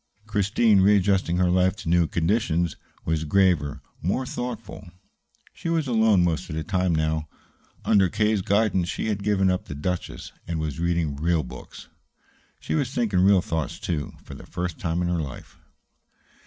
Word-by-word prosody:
Christine, 105 Hz, 0 st, +3 dB
readjusting 95 Hz, -3 st, +3 dB
her 90 Hz, -1 st, +3 dB
life 90 Hz, 0 st, +3 dB
to -, -, -10 dB
new 85 Hz, 0 st, +3 dB
conditions, 85 Hz, -1 st, 0 dB, 0.3 s
was 80 Hz, -1 st, 0 dB
graver, 75 Hz, -5 st, +2 dB, 0.2 s
more 115 Hz, +10 st, -1 dB
thoughtful. 120 Hz, -7 st, -6 dB, 0.6 s
She 165 Hz, -, -5 dB
was 165 Hz, -2 st, +1 dB
alone 110 Hz, -6 st, +3 dB
most 85 Hz, -2 st, -1 dB
of 75 Hz, -, -4 dB
the 80 Hz, -, -2 dB
time 90 Hz, -2 st, 0 dB
now. 80 Hz, 0 st, 0 dB, 0.6 s
Under 95 Hz, -3 st, +4 dB
K.'s 105 Hz, +2 st, +1 dB
guidance, 95 Hz, -3 st, +1 dB
she -, -, -2 dB
had 105 Hz, -2 st, -1 dB
given 95 Hz, -2 st, +2 dB
up 90 Hz, -, -2 dB
the 75 Hz, -, -7 dB
"Duchess" 90 Hz, +5 st, -4 dB, 0.2 s
and 85 Hz, -1 st, -2 dB
was 80 Hz, 0 st, -3 dB
reading 85 Hz, -4 st, 0 dB
real 80 Hz, +1 st, +1 dB
books. 60 Hz, -, -11 dB, 0.7 s
She -, -, -4 dB
was 140 Hz, -5 st, 0 dB
thinking 115 Hz, -8 st, 0 dB
real 95 Hz, 0 st, +5 dB
thoughts, 80 Hz, -4 st, -3 dB
too, 75 Hz, -4 st, -3 dB
for -, -, -10 dB
the -, -, -11 dB
first 90 Hz, -2 st, -4 dB
time 85 Hz, 0 st, -1 dB
in -, -, 0 dB
her 85 Hz, -1 st, 0 dB
life. 70 Hz, -5 st, -9 dB
90 Hz, 170 wpm, -25 LUFS, 80-100 Hz, 0.7 s, real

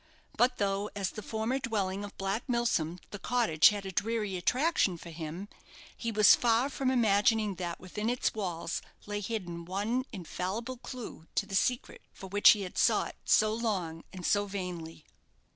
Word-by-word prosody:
But 245 Hz, +3 st, +3 dB
though, 200 Hz, 0 st, 0 dB
as 195 Hz, -2 st, -2 dB
the 215 Hz, -, -7 dB
former 220 Hz, +5 st, -2 dB
dwelling 205 Hz, -6 st, -2 dB
of 205 Hz, -, -9 dB
Black 195 Hz, +4 st, -2 dB
Milsom, 230 Hz, -9 st, +1 dB
the 205 Hz, -, -6 dB
cottage 225 Hz, -12 st, +4 dB
had 205 Hz, -1 st, -4 dB
a 190 Hz, -, -4 dB
dreary 210 Hz, 0 st, -1 dB
attraction 250 Hz, -, +2 dB
for 170 Hz, 0 st, -10 dB
him, 165 Hz, +4 st, -6 dB, 0.5 s
he 230 Hz, -, -3 dB
was 215 Hz, -2 st, +7 dB
far 240 Hz, +3 st, +3 dB
from 265 Hz, -1 st, 0 dB
imagining 220 Hz, -3 st, +3 dB
that 170 Hz, -1 st, -3 dB
within 210 Hz, +4 st, -3 dB
its 245 Hz, +1 st, 0 dB
walls 175 Hz, -5 st, -3 dB, 0.2 s
lay 205 Hz, 0 st, -3 dB
hidden 185 Hz, -5 st, -4 dB
one 205 Hz, +8 st, -1 dB
infallible 205 Hz, +6 st, -4 dB
clue 235 Hz, -10 st, -8 dB
to -, -, +1 dB
the -, -, -10 dB
secret 245 Hz, +5 st, 0 dB
for -, -, -11 dB
which 205 Hz, +2 st, +6 dB
he 210 Hz, -2 st, -4 dB
had 180 Hz, -, -5 dB
sought -, -, +2 dB
so 215 Hz, 0 st, +4 dB
long 190 Hz, -8 st, -2 dB
and 180 Hz, -2 st, -7 dB
so 205 Hz, 0 st, +2 dB
vainly. 175 Hz, -5 st, -6 dB
205 Hz, 170 wpm, -30 LUFS, 185-230 Hz, 0.5 s, was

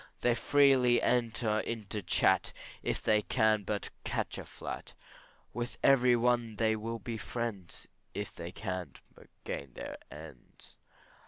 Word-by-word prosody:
They 120 Hz, -, +4 dB
freely 130 Hz, -1 st, +5 dB
enter 115 Hz, -3 st, +1 dB
into 110 Hz, -2 st, -3 dB
chat, 90 Hz, -, +2 dB, 0.3 s
If -, -, -2 dB
they 105 Hz, -1 st, +4 dB
can 110 Hz, -1 st, +2 dB
but 105 Hz, +1 st, -3 dB
catch -, -, -2 dB
a -, -, -7 dB
flat; -, -, -7 dB, 0.6 s
With 120 Hz, +1 st, -4 dB
every 125 Hz, -3 st, +6 dB
one 120 Hz, -2 st, +1 dB
they 110 Hz, 0 st, +2 dB
will 115 Hz, +2 st, -4 dB
be 115 Hz, +1 st, -5 dB
friends, 105 Hz, -4 st, -5 dB, 0.3 s
If 105 Hz, 0 st, -4 dB
they 85 Hz, +1 st, -7 dB
can 95 Hz, -3 st, -4 dB, 0.2 s
but -, -, -17 dB, 0.2 s
gain 70 Hz, -3 st, -5 dB
their -, -, -6 dB
ends. 75 Hz, -4 st, -13 dB
110 Hz, 140 wpm, -32 LUFS, 100-120 Hz, 0.6 s, every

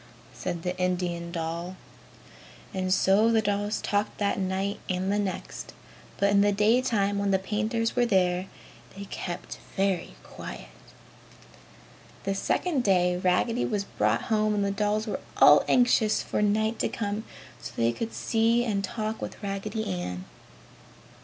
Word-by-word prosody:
said 170 Hz, -1 st, -4 dB
the 180 Hz, 0 st, -2 dB
Indian 175 Hz, -2 st, -1 dB
doll. 170 Hz, +2 st, -4 dB, 1.0 s
And 185 Hz, -1 st, -1 dB
so 195 Hz, +4 st, +4 dB
the 225 Hz, -, +4 dB
dolls 205 Hz, 0 st, 0 dB
talked 205 Hz, +1 st, -1 dB
that 200 Hz, -1 st, 0 dB
night 190 Hz, +2 st, -1 dB
and 185 Hz, +2 st, 0 dB
the 205 Hz, -, +1 dB
next. 195 Hz, -2 st, -4 dB, 0.4 s
But 200 Hz, 0 st, +3 dB
in 200 Hz, 0 st, +5 dB
the 205 Hz, 0 st, +4 dB
daytime 210 Hz, -1 st, +2 dB
when 200 Hz, 0 st, 0 dB
the 195 Hz, -, +4 dB
painters 220 Hz, +4 st, -1 dB
were 245 Hz, -1 st, +3 dB
there, 185 Hz, -3 st, +2 dB, 0.5 s
they 200 Hz, -, -6 dB
kept 175 Hz, 0 st, -5 dB, 0.2 s
very 195 Hz, -3 st, 0 dB
quiet. -, -, -9 dB, 1.5 s
The 195 Hz, -, 0 dB
second 275 Hz, -, 0 dB
day 180 Hz, -3 st, +3 dB
Raggedy 185 Hz, +7 st, +1 dB
was 205 Hz, -3 st, -1 dB
brought 105 Hz, -, 0 dB
home 215 Hz, -1 st, +1 dB
and 205 Hz, -1 st, +1 dB
the 200 Hz, -, 0 dB
dolls 210 Hz, +2 st, 0 dB
were 215 Hz, -, -3 dB, 0.2 s
all -, -, +8 dB
anxious 245 Hz, -3 st, +3 dB
for -, -, -1 dB
night 220 Hz, +2 st, +1 dB
to -, -, +1 dB
come 210 Hz, 0 st, -3 dB, 0.4 s
so -, -, -7 dB
that -, -, -3 dB
they 115 Hz, -, +4 dB
could 225 Hz, -, -4 dB
see 230 Hz, +1 st, +2 dB
and 200 Hz, -4 st, 0 dB
talk 215 Hz, +2 st, -3 dB
with -, -, -7 dB
Raggedy 200 Hz, +2 st, -3 dB
Ann. 90 Hz, 0 st, -4 dB
200 Hz, 155 wpm, -27 LUFS, 185-215 Hz, 1.5 s, all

